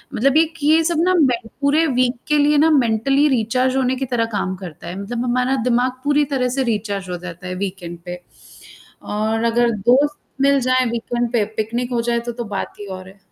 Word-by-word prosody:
मतलब 275 Hz, +5 st, +3 dB
एक 325 Hz, 0 st, +3 dB
ये 315 Hz, +2 st, +4 dB
सब 340 Hz, -1 st, 0 dB
ना 370 Hz, 0 st, +3 dB
में 260 Hz, -6 st, +3 dB, 0.2 s
पूरे 295 Hz, +4 st, +3 dB
वीक 255 Hz, -2 st, +1 dB
के 300 Hz, -, +2 dB
लिए 295 Hz, +1 st, +3 dB
ना 315 Hz, +2 st, +5 dB
मेंटली 270 Hz, +2 st, +3 dB
रिचार्ज 255 Hz, +1 st, +1 dB
होने 260 Hz, 0 st, +1 dB
की 265 Hz, +1 st, -3 dB
तरह 240 Hz, -2 st, 0 dB
काम 190 Hz, -2 st, -1 dB
करता 175 Hz, -3 st, -10 dB
है। 180 Hz, +3 st, -6 dB
मतलब 235 Hz, +4 st, -3 dB
हमारा 250 Hz, +2 st, +1 dB
दिमाग 250 Hz, +1 st, +2 dB
पूरी 290 Hz, 0 st, +2 dB
तरह 250 Hz, -1 st, +1 dB
से 265 Hz, -, +2 dB
रिचार्ज 205 Hz, -5 st, -2 dB
हो 180 Hz, -, -3 dB
जाता 175 Hz, 0 st, -9 dB
है 180 Hz, -, -4 dB
वीकएंड 180 Hz, -3 st, -5 dB
पे 175 Hz, 0 st, -7 dB, 0.8 s
और 220 Hz, +2 st, -1 dB
अगर 240 Hz, 0 st, +2 dB, 0.2 s
दोस्त 290 Hz, +4 st, +4 dB, 0.2 s
मिल 280 Hz, 0 st, +4 dB
जाए 255 Hz, 0 st, +2 dB
वीकएंड 240 Hz, 0 st, -2 dB
पे 220 Hz, -3 st, +2 dB
पिकनिक 235 Hz, +3 st, -2 dB
हो 235 Hz, -, +1 dB
जाए 235 Hz, 0 st, 0 dB
तो, 240 Hz, +1 st, -5 dB
तो 240 Hz, 0 st, -5 dB
बात 205 Hz, -3 st, -5 dB
ही 205 Hz, -, -7 dB
और 185 Hz, -1 st, -8 dB
है। 195 Hz, +1 st, -18 dB
240 Hz, 210 wpm, -20 LUFS, 210-270 Hz, 0.8 s, ना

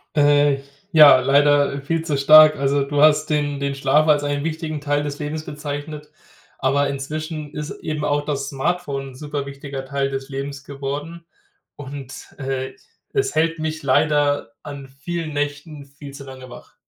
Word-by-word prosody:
Äh. 145 Hz, -1 st, +4 dB, 0.4 s
Ja, 150 Hz, -4 st, +9 dB
leider 140 Hz, +1 st, +3 dB
viel 160 Hz, +3 st, -2 dB
zu 150 Hz, -4 st, 0 dB
stark. 155 Hz, +2 st, +8 dB
Also, 140 Hz, +1 st, +1 dB
du 145 Hz, +1 st, -1 dB
hast 155 Hz, 0 st, +4 dB
den 145 Hz, -2 st, 0 dB
den 140 Hz, 0 st, -2 dB
Schlaf 145 Hz, +3 st, +2 dB
als 150 Hz, -1 st, +4 dB
einen 145 Hz, 0 st, -1 dB
wichtigen 160 Hz, -1 st, -3 dB
Teil 145 Hz, 0 st, 0 dB
des 145 Hz, -1 st, -5 dB
Lebens 155 Hz, +1 st, -4 dB
bezeichnet. 150 Hz, 0 st, -6 dB, 0.5 s
Aber 140 Hz, +2 st, +2 dB
inzwischen 150 Hz, +2 st, -5 dB
ist 150 Hz, 0 st, -5 dB
eben 155 Hz, -1 st, -3 dB
auch 145 Hz, 0 st, 0 dB
das 140 Hz, -2 st, -2 dB
Smartphone 140 Hz, -1 st, -2 dB
'n -, -, -15 dB
super 145 Hz, 0 st, -4 dB
wichtiger 140 Hz, -1 st, -7 dB
Teil 140 Hz, 0 st, -1 dB
des 135 Hz, 0 st, -5 dB
Lebens 140 Hz, +1 st, -5 dB
geworden. 145 Hz, +5 st, -6 dB, 0.5 s
Und, 135 Hz, -2 st, -9 dB
äh, 130 Hz, -1 st, -3 dB, 0.4 s
es 405 Hz, -, 0 dB
hält 165 Hz, +1 st, +1 dB
mich 155 Hz, 0 st, -3 dB
leider 145 Hz, +1 st, +2 dB
an 140 Hz, -2 st, -8 dB
vielen 155 Hz, +4 st, -5 dB
Nächten 145 Hz, 0 st, -4 dB
viel 140 Hz, 0 st, -12 dB
zu 140 Hz, 0 st, -9 dB
lange 130 Hz, -1 st, -11 dB
wach. 125 Hz, -, -13 dB
145 Hz, 165 wpm, -21 LUFS, 140-150 Hz, 0.5 s, Ja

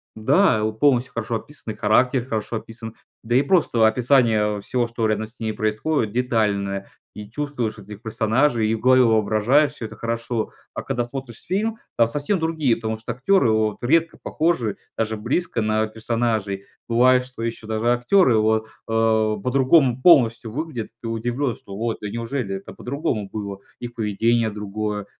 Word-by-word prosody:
Да, 130 Hz, -, +3 dB
вот 110 Hz, 0 st, -3 dB
полностью 130 Hz, -3 st, +3 dB
хорошо 115 Hz, 0 st, -3 dB
описаны, 115 Hz, -3 st, -8 dB
и -, -, -16 dB
характер 120 Hz, +4 st, +2 dB
хорошо 110 Hz, 0 st, -2 dB
описан. 115 Hz, 0 st, -9 dB, 0.3 s
Да 120 Hz, +2 st, -1 dB
и 130 Hz, -, +6 dB
просто 140 Hz, -8 st, +3 dB
описание, 110 Hz, -3 st, +2 dB
э, -, -, -9 dB
всего, 120 Hz, +2 st, 0 dB
что 115 Hz, -1 st, -1 dB
рядом 110 Hz, 0 st, 0 dB
с 115 Hz, +4 st, -12 dB
ними 110 Hz, -1 st, -2 dB
происходит, 110 Hz, +3 st, -1 dB
детальное, 105 Hz, -5 st, -1 dB, 0.2 s
и 105 Hz, 0 st, -9 dB
чувствуешь 130 Hz, -6 st, -3 dB
этих 105 Hz, +1 st, -11 dB
персонажей, 110 Hz, +2 st, +1 dB
и 110 Hz, -, +1 dB
в 110 Hz, -, -6 dB
голове 130 Hz, 0 st, +5 dB
воображаешь, 110 Hz, +6 st, +3 dB
всё 120 Hz, -6 st, -7 dB
это 110 Hz, -, -9 dB
хорошо. 115 Hz, 0 st, -3 dB, 0.2 s
А -, -, -4 dB
когда 125 Hz, -3 st, -1 dB
смотришь 120 Hz, -2 st, -7 dB
фильм, 215 Hz, +5 st, -1 dB, 0.2 s
там 115 Hz, -1 st, +5 dB
совсем 145 Hz, -, -1 dB
другие, 160 Hz, -7 st, +1 dB
потому 110 Hz, -1 st, -3 dB
что 115 Hz, +2 st, -5 dB
актеры 135 Hz, -, +3 dB
вот 110 Hz, -1 st, +1 dB
редко 165 Hz, +6 st, +2 dB
похожи 155 Hz, -10 st, 0 dB, 0.2 s
даже 110 Hz, -1 st, -1 dB
близко 120 Hz, +2 st, -1 dB
на 110 Hz, 0 st, +1 dB
персонажей. 110 Hz, -3 st, -2 dB, 0.2 s
Бывает, 125 Hz, +2 st, +4 dB
что 125 Hz, -2 st, -10 dB
еще 115 Hz, -1 st, -4 dB
даже 110 Hz, +1 st, -2 dB
актеры 120 Hz, -, +3 dB
вот, 110 Hz, 0 st, +2 dB, 0.2 s
а, 110 Hz, -1 st, +2 dB
по-другому 130 Hz, +2 st, +3 dB
полностью 115 Hz, -8 st, +5 dB
выглядят. 140 Hz, -4 st, -4 dB
И -, -, -44 dB
ты 115 Hz, -, -4 dB
удивлен, 120 Hz, +3 st, -2 dB
что 100 Hz, -, -11 dB
вот: 115 Hz, 0 st, -2 dB
"Да 105 Hz, -, -4 dB
неужели, 115 Hz, -2 st, -3 dB
это 95 Hz, -, -11 dB
по-другому 125 Hz, -7 st, -3 dB
было!" 100 Hz, -2 st, -5 dB, 0.2 s
Их 120 Hz, -1 st, -7 dB
поведение 115 Hz, +1 st, +1 dB
другое, 105 Hz, 0 st, -4 dB
115 Hz, 170 wpm, -22 LUFS, 110-130 Hz, 0.3 s, и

